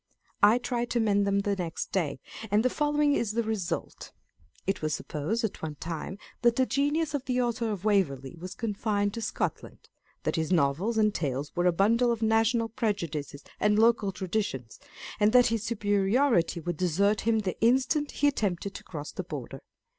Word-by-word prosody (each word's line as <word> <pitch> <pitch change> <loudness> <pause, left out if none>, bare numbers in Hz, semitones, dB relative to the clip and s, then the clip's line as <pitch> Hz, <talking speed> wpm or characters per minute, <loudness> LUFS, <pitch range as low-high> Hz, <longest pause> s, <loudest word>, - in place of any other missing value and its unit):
I 210 +3 +6
tried 240 -1 -2
to 240 - 0
mend 205 -2 +2
them 200 0 +2
the 200 0 0
next 175 -4 -4
day, 160 -8 -1 0.3
and 210 +4 +2
the 255 - +3
following 295 -1 +2
is 230 -6 0
the 235 +1 +1
result. 215 -5 -4
â€" - - -34
It 195 - -1
was 155 -1 0
supposed 165 - -3
at 220 - -3
one 155 -2 -4
time 165 +5 -5 0.2
that 240 -1 +4
the 260 - +3
genius 290 +4 0
of 280 -2 -2
the 250 -1 0
Author 235 -1 0
of 205 -2 -4
Waverley 160 -9 +1
was 180 +2 -8
confined 205 -2 -1
to 230 - -5
Scotland; 225 - -4 0.3
that - - -1
his 160 +1 -1
Novels 175 +8 +1
and 215 -1 +3
Tales 140 -3 -2
were 175 0 +2
a - - +5
bundle 230 +7 +3
of 230 -1 -2
national 225 +1 +2
prejudices 165 -11 -3 0.2
and 210 0 +3
local 225 -3 +3
traditions, 180 - -3 0.4
and 210 +1 +4
that 250 -1 +7
his 225 - 0
superiority 205 -2 +2
would 175 0 -4
desert 200 +4 +2
him 225 0 +2
the 185 -3 -4
instant 265 +5 +2
he 290 - +1
attempted 200 -7 -1
to - - -9
cross 150 -3 -7
the - - -5
Border. - - -7
210 Hz, 185 wpm, -28 LUFS, 175-235 Hz, 0.4 s, that